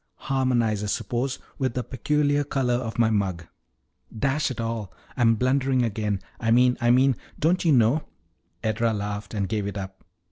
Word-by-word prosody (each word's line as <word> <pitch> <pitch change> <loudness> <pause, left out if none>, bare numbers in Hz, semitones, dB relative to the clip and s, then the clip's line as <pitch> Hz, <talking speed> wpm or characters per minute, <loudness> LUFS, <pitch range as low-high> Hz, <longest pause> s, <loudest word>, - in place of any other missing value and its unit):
harmonize, 120 -6 +1
I - - -2
suppose, 125 +5 -2 0.2
with 130 -3 -1
the 125 - -1
peculiar 145 +4 +1
color 135 -3 0
of 120 -2 -2
my 115 -1 +3
mug. 95 -5 -1 0.7
Dash 140 +5 +1
it 130 - -6
all, 115 -3 -3 0.2
I'm 115 -3 +4
blundering 130 +1 +2
again! 105 -3 -1 0.2
I 115 - -1
mean 125 +2 +5
I 120 - +3
mean 130 +2 +5 0.2
don't 170 +4 +2
you 165 - +3
know 125 +3 +3 0.3
" - - -45
Edra 110 +1 +1
laughed 105 +1 -4
and 100 -2 -1
gave 105 0 -2
it 100 - -5
up. 95 -1 -7
120 Hz, 175 wpm, -25 LUFS, 105-130 Hz, 0.7 s, mean